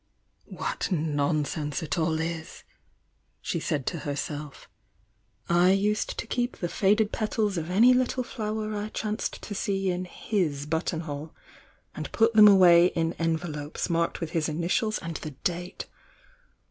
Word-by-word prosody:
"What -, -, -3 dB
nonsense 150 Hz, -1 st, -1 dB
it 160 Hz, -, -2 dB
all 160 Hz, -1 st, 0 dB
is!" 160 Hz, 0 st, -5 dB, 0.8 s
she -, -, -2 dB
said 140 Hz, -4 st, -2 dB
to 170 Hz, -, -2 dB
herself. 145 Hz, 0 st, -5 dB, 0.8 s
"I 180 Hz, +3 st, +4 dB
usei 210 Hz, +1 st, +1 dB
to -, -, -4 dB
keep 245 Hz, +2 st, -2 dB
the 175 Hz, -, -3 dB
faded 210 Hz, +3 st, +2 dB
petals 215 Hz, -2 st, -1 dB
of 165 Hz, -1 st, -3 dB
any 230 Hz, +7 st, +6 dB
little 255 Hz, 0 st, +1 dB
flower 215 Hz, -3 st, -3 dB
I 210 Hz, +1 st, -3 dB
chanced 215 Hz, 0 st, -3 dB
to 205 Hz, -, -5 dB
see 195 Hz, -1 st, -1 dB
in 180 Hz, +1 st, -3 dB
hit 160 Hz, -7 st, -2 dB
buttonhole, 160 Hz, -2 st, -3 dB, 0.6 s
and -, -, -6 dB
put 225 Hz, 0 st, +3 dB
them 215 Hz, -1 st, +9 dB
away 180 Hz, -3 st, +7 dB
in 165 Hz, -2 st, -1 dB
envelopes 160 Hz, -1 st, -2 dB
marked 170 Hz, 0 st, 0 dB
with 165 Hz, -2 st, -3 dB
his 160 Hz, -2 st, 0 dB
initials 175 Hz, +8 st, 0 dB
and 165 Hz, -1 st, -5 dB
the 155 Hz, -, -7 dB
date! 175 Hz, 0 st, -3 dB
175 Hz, 145 wpm, -27 LUFS, 160-210 Hz, 0.8 s, them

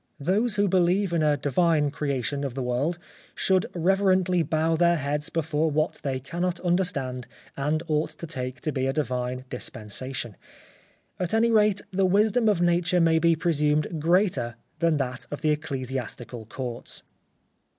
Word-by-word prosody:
Those 205 Hz, +9 st, +1 dB
who 205 Hz, 0 st, +2 dB
believe 185 Hz, +1 st, +2 dB
in 165 Hz, -, +2 dB
a 150 Hz, -1 st, +3 dB
Divine 150 Hz, +2 st, +2 dB
Creation 140 Hz, -2 st, -2 dB
of 135 Hz, -3 st, -3 dB
the 135 Hz, -, -2 dB
world 130 Hz, +8 st, 0 dB, 0.4 s
should 190 Hz, +3 st, +2 dB
reverently 185 Hz, 0 st, +3 dB
bow 160 Hz, 0 st, +1 dB
their 170 Hz, +1 st, +4 dB
heads 150 Hz, +2 st, -2 dB
before 160 Hz, -1 st, 0 dB
what 155 Hz, +2 st, 0 dB
they 135 Hz, -2 st, -2 dB
cannot 175 Hz, +6 st, -2 dB
understand 140 Hz, -9 st, -1 dB, 0.3 s
and 150 Hz, +3 st, -1 dB
ought 155 Hz, 0 st, +1 dB
to 155 Hz, +2 st, -8 dB
take 130 Hz, -5 st, -5 dB
to 155 Hz, -, -1 dB
be 130 Hz, -2 st, -1 dB
a 135 Hz, -, 0 dB
divine 125 Hz, -3 st, -2 dB
dispensation. 120 Hz, 0 st, -5 dB, 0.8 s
At 180 Hz, +3 st, -1 dB
any 230 Hz, +1 st, +3 dB
rate, 210 Hz, -3 st, +3 dB
the 190 Hz, 0 st, +2 dB
wisdom 215 Hz, +4 st, +3 dB
of 195 Hz, -5 st, +2 dB
Nature 175 Hz, +1 st, +2 dB
may 165 Hz, -1 st, +4 dB
be 165 Hz, 0 st, +4 dB
presumed 155 Hz, -1 st, 0 dB
greater 165 Hz, -, +2 dB, 0.2 s
than 165 Hz, -2 st, +2 dB
that 130 Hz, -2 st, -3 dB
of 145 Hz, -, -6 dB
the 155 Hz, -, +3 dB
Ecclesiastical 130 Hz, -5 st, -4 dB
Courts. 120 Hz, 0 st, -5 dB
155 Hz, 155 wpm, -26 LUFS, 135-180 Hz, 0.8 s, their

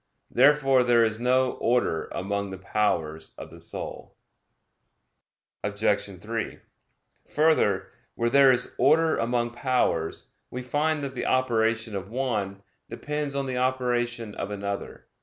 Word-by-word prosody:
Therefore 135 Hz, -3 st, +5 dB
there 120 Hz, -1 st, +4 dB
is 110 Hz, -1 st, 0 dB
no 130 Hz, +1 st, +2 dB
order 115 Hz, -9 st, +1 dB
among 100 Hz, +1 st, -2 dB
the 95 Hz, -, -7 dB
powers 85 Hz, -6 st, -1 dB
of -, -, -9 dB
the -, -, -12 dB
soul. -, -, -7 dB, 1.5 s
Obj. -, -, -1 dB
3: -, -, -4 dB, 0.7 s
Further, 150 Hz, -11 st, +2 dB, 0.2 s
where 115 Hz, 0 st, 0 dB
there 135 Hz, 0 st, +7 dB
is 125 Hz, -, -1 dB
order 160 Hz, +4 st, +4 dB
among 120 Hz, 0 st, 0 dB
powers, 120 Hz, -, -1 dB, 0.2 s
we 125 Hz, +1 st, -6 dB
find 145 Hz, +4 st, 0 dB
that 135 Hz, -1 st, -4 dB
the 125 Hz, -, -3 dB
operation 115 Hz, -3 st, +1 dB
of 95 Hz, 0 st, -5 dB
one 105 Hz, -6 st, -2 dB, 0.3 s
depends 150 Hz, -1 st, -4 dB
on 140 Hz, -1 st, -1 dB
the 130 Hz, -1 st, -3 dB
operation 120 Hz, -3 st, -1 dB
of 100 Hz, -, -5 dB
another. 100 Hz, -1 st, -5 dB
120 Hz, 130 wpm, -26 LUFS, 105-130 Hz, 1.5 s, there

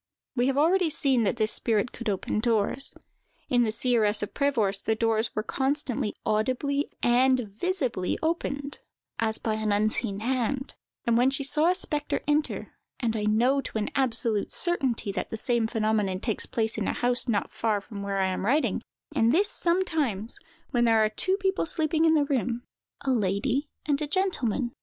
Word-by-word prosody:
We 245 Hz, 0 st, +2 dB
have 270 Hz, 0 st, 0 dB
already 340 Hz, +3 st, +3 dB
seen 275 Hz, -7 st, +1 dB
that 200 Hz, -, +1 dB
this 215 Hz, -1 st, +2 dB
spirit 225 Hz, 0 st, 0 dB
could 235 Hz, -2 st, -4 dB
open 200 Hz, +1 st, -1 dB
doors. 230 Hz, +3 st, +1 dB, 0.5 s
In 245 Hz, -1 st, +3 dB
the 225 Hz, -2 st, +1 dB
"Seeress 220 Hz, -3 st, +2 dB
of 205 Hz, -, -5 dB
Prevorst," 225 Hz, -9 st, +1 dB
the 220 Hz, -, +2 dB
doors 225 Hz, 0 st, +1 dB
were 215 Hz, -, -1 dB
constantly 265 Hz, -3 st, 0 dB
audibly 255 Hz, +7 st, 0 dB
and 255 Hz, +1 st, +4 dB
visibly 235 Hz, -, -2 dB
opened, 285 Hz, -3 st, -2 dB, 0.4 s
as 220 Hz, -1 st, 0 dB
by 220 Hz, -, -2 dB
an 215 Hz, -1 st, -1 dB
unseen 210 Hz, 0 st, 0 dB
hand, 260 Hz, +2 st, -1 dB, 0.3 s
when 235 Hz, +2 st, +4 dB
she 270 Hz, +1 st, -1 dB
saw 305 Hz, +4 st, +2 dB
a 365 Hz, -, +2 dB
spectre 300 Hz, -5 st, -1 dB
enter; 295 Hz, +1 st, 0 dB, 0.3 s
and 230 Hz, -3 st, -1 dB
I 210 Hz, -1 st, -1 dB
know 245 Hz, +6 st, +3 dB
to 225 Hz, -, -5 dB
an 210 Hz, -, -2 dB
absolute 230 Hz, -5 st, +1 dB
certainty 265 Hz, -, +1 dB
that 195 Hz, -, -4 dB
the 225 Hz, -, -4 dB
same 235 Hz, 0 st, +1 dB
phenomenon 215 Hz, -4 st, 0 dB
takes 220 Hz, 0 st, -1 dB
place 225 Hz, -1 st, -1 dB
in -, -, -1 dB
a -, -, 0 dB
house 245 Hz, +1 st, +2 dB
not 205 Hz, -3 st, 0 dB
far 220 Hz, -2 st, 0 dB
from 200 Hz, 0 st, -9 dB
where 200 Hz, 0 st, -2 dB
I 190 Hz, -1 st, +1 dB
am 185 Hz, -, -3 dB
writing; 275 Hz, +9 st, +1 dB, 0.3 s
and 230 Hz, +1 st, +3 dB
this, 395 Hz, +8 st, +3 dB
sometimes, 315 Hz, -, -1 dB, 0.3 s
when 240 Hz, -2 st, +2 dB
there 225 Hz, -1 st, +4 dB
are -, -, +1 dB
two 375 Hz, -, 0 dB
people 385 Hz, -3 st, 0 dB
sleeping 315 Hz, 0 st, +1 dB
in 320 Hz, 0 st, +5 dB
the 295 Hz, -2 st, +3 dB
room—a 250 Hz, 0 st, -4 dB
lady 240 Hz, +6 st, 0 dB, 0.2 s
and 285 Hz, -2 st, +1 dB
gentleman. 275 Hz, -, 0 dB
240 Hz, 175 wpm, -27 LUFS, 215-280 Hz, 0.5 s, in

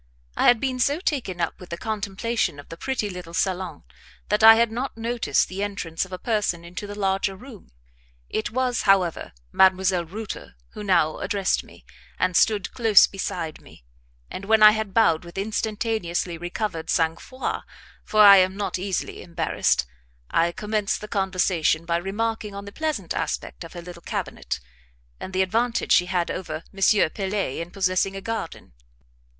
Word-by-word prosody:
I -, -, +2 dB
had 240 Hz, -2 st, +6 dB
been 260 Hz, 0 st, -2 dB
so 285 Hz, +5 st, +2 dB
taken 255 Hz, -, -2 dB
up -, -, -2 dB
with 180 Hz, -, -12 dB
the 170 Hz, -, -4 dB
contemplation 215 Hz, -3 st, -2 dB
of 145 Hz, -, -12 dB
the 165 Hz, -, -7 dB
pretty 245 Hz, +3 st, -2 dB
little 180 Hz, -3 st, -8 dB
salon 185 Hz, 0 st, -2 dB, 0.5 s
that 210 Hz, +1 st, +2 dB
I 225 Hz, 0 st, +11 dB
had 230 Hz, 0 st, +2 dB
not 245 Hz, +2 st, -4 dB
noticed 235 Hz, +1 st, 0 dB
the 190 Hz, +2 st, -5 dB
entrance 195 Hz, -5 st, -2 dB
of 190 Hz, -, -17 dB
a 185 Hz, -, -4 dB
person 205 Hz, -6 st, -1 dB
into 180 Hz, +4 st, -7 dB
the 205 Hz, 0 st, -8 dB
larger 195 Hz, 0 st, 0 dB
room. 230 Hz, 0 st, -13 dB, 0.6 s
It 220 Hz, -, -2 dB
was, 250 Hz, 0 st, 0 dB
however, 185 Hz, -4 st, +2 dB, 0.2 s
Mdlle. 185 Hz, -2 st, +3 dB
Reuter 215 Hz, -, -7 dB, 0.2 s
who -, -, -8 dB
now 170 Hz, -6 st, +2 dB
addressed 200 Hz, -4 st, 0 dB
me, -, -, -17 dB, 0.3 s
and 185 Hz, -1 st, 0 dB
stood 205 Hz, -1 st, +3 dB
close 225 Hz, -4 st, +6 dB
beside 175 Hz, -4 st, -5 dB
me; -, -, -17 dB, 0.5 s
and 195 Hz, -, -6 dB
when 220 Hz, +1 st, +4 dB
I 210 Hz, -, +11 dB
had 215 Hz, -2 st, -3 dB
bowed 170 Hz, -9 st, +4 dB
with 170 Hz, +2 st, -12 dB
instantaneously 210 Hz, -4 st, -2 dB
recovered 175 Hz, 0 st, -4 dB
sang 165 Hz, -1 st, +2 dB
froid 255 Hz, +7 st, -4 dB, 0.4 s
for 215 Hz, -, +3 dB
I 200 Hz, -1 st, +10 dB
am 185 Hz, +1 st, +3 dB
not 200 Hz, -2 st, -2 dB
easily 190 Hz, -1 st, -3 dB
embarrassed 165 Hz, -, 0 dB, 0.5 s
I 170 Hz, +1 st, +2 dB
commenced 210 Hz, +2 st, -2 dB
the 210 Hz, -, -7 dB
conversation 185 Hz, -5 st, +1 dB
by 170 Hz, 0 st, +1 dB
remarking 210 Hz, +3 st, -3 dB
on 200 Hz, 0 st, -7 dB
the 200 Hz, -, -9 dB
pleasant 295 Hz, -, -2 dB
aspect -, -, -3 dB
of 165 Hz, -, -11 dB
her 175 Hz, -1 st, -8 dB
little 175 Hz, -1 st, -10 dB
cabinet, 65 Hz, -, -4 dB, 0.6 s
and -, -, -7 dB
the 190 Hz, 0 st, +2 dB
advantage 230 Hz, +5 st, 0 dB
she 180 Hz, -, +5 dB
had 175 Hz, -1 st, 0 dB
over 160 Hz, -3 st, -5 dB
M. 195 Hz, -3 st, +3 dB
Pelet 195 Hz, -7 st, -2 dB
in 170 Hz, -, -6 dB
possessing 185 Hz, +1 st, 0 dB
a 195 Hz, -, -5 dB
garden. 205 Hz, -, -5 dB
195 Hz, 170 wpm, -24 LUFS, 175-220 Hz, 0.6 s, I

